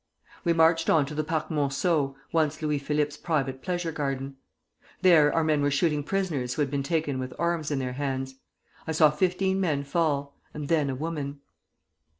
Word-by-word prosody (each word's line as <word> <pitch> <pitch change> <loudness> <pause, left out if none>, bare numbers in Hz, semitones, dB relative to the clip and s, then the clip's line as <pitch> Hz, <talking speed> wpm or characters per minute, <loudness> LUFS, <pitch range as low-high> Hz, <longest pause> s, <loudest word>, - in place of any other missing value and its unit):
"We 170 - +2
marched 165 0 +3
on 155 -3 +4
to 145 - -7
the 155 +1 -1
Parc 155 0 -2
Monceau 145 0 0 0.2
[once 155 -2 +1
Louis 150 -2 0
Philippe's 150 +1 -1
private 135 -6 -1
pleasure 175 -2 -2
garden]. 135 -3 -3 0.7
There 160 -5 +6
our 165 - +1
men 155 -2 +2
were 145 - +2
shooting 150 +1 +1
prisoners 150 -9 -1
who 150 - +1
had 135 - -4
been 140 -1 0
taken 145 -2 -1
with 130 0 -5
arms 170 -2 -1
in 145 - -1
their 130 -1 -2
hands. 135 -1 -3 0.5
I 160 - -1
saw 155 -1 +5
fifteen 190 +4 +1
men 150 -6 0
fall, 140 -2 -1 0.2
and 150 -1 -5
then 155 -4 +2
a 130 - -2
woman. 145 -1 -4
150 Hz, 180 wpm, -27 LUFS, 140-165 Hz, 0.7 s, There